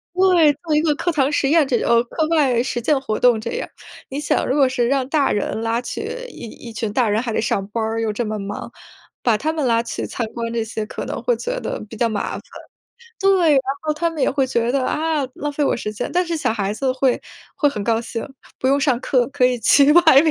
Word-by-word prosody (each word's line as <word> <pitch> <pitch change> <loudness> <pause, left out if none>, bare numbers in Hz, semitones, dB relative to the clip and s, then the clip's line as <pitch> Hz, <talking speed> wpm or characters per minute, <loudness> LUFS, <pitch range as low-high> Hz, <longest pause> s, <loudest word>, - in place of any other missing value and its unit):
对， 360 -5 +5
做 315 -3 -1
一 300 - +4
个 310 -2 +2
课 345 - -1
堂 285 -3 +1
实 275 -2 +1
验 315 -2 +4
这 245 -3 +1
种 235 0 +3
课 310 +6 -2
外 275 -8 +3
实 250 -2 -2
践 280 +3 +2
活 215 -5 -2
动 245 -3 +4
这 235 - -4
样。 - - -4 0.4
你 275 - -4
想， 295 - 0
如 260 - +1
果 275 -3 +4
是 245 -2 0
让 270 -1 +1
大 290 -3 +2
人 210 +2 -2
拉 230 +1 0
起 245 - -5 0.3
一 240 - -9
一 230 0 -11
群 220 -1 -3
大 235 -2 +2
人 215 +2 +1
还 230 - -3
得 - - 0
上 200 -3 -1
班 225 +1 -2
儿， 225 +1 -2
又 220 -2 -1
这 240 +3 -2
么 215 0 -3
忙， 200 +1 -6 0.5
把 235 -3 +3
他 310 +6 -1
们 310 -4 -1
拉 230 -1 +3
去 230 - -5
参 240 - -4
观， 230 -1 -4
这 230 -1 0
些 220 -1 -4
可 - - -6
能 - - -5
会 - - +2
觉 - - -3
得 - - -4
比 225 - -9
较 235 - +2
麻 205 -2 -2
烦。 - - -5 0.8
对， 380 -5 +4
然 270 - +5 0.2
后 305 - 0
他 335 +2 0
们 315 -4 -4
也 - - +3
会 270 -1 +1
觉 235 -2 0
得： 270 -2 +1
“啊， 310 -3 0
浪 295 - -3
费 290 +1 0
我 - - +2
时 210 - -4
间。” 215 +3 -4
但 360 +1 +2
是 335 -1 -2
小 300 - 0
孩 205 -2 -2
子 260 +2 0
会 260 -1 +1 0.4
会 325 - +2
很 215 -7 -4
高 225 -1 +2
兴， 230 -1 -5 0.3
不 260 - 0
用 275 +1 +3
上 260 -4 +1
课 255 -1 +1
可 265 -2 +2
以 250 -1 0
去 280 +6 +5
外 320 -5 +7
面， 320 - +3
260 Hz, 280 characters per minute, -20 LUFS, 230-300 Hz, 0.8 s, 外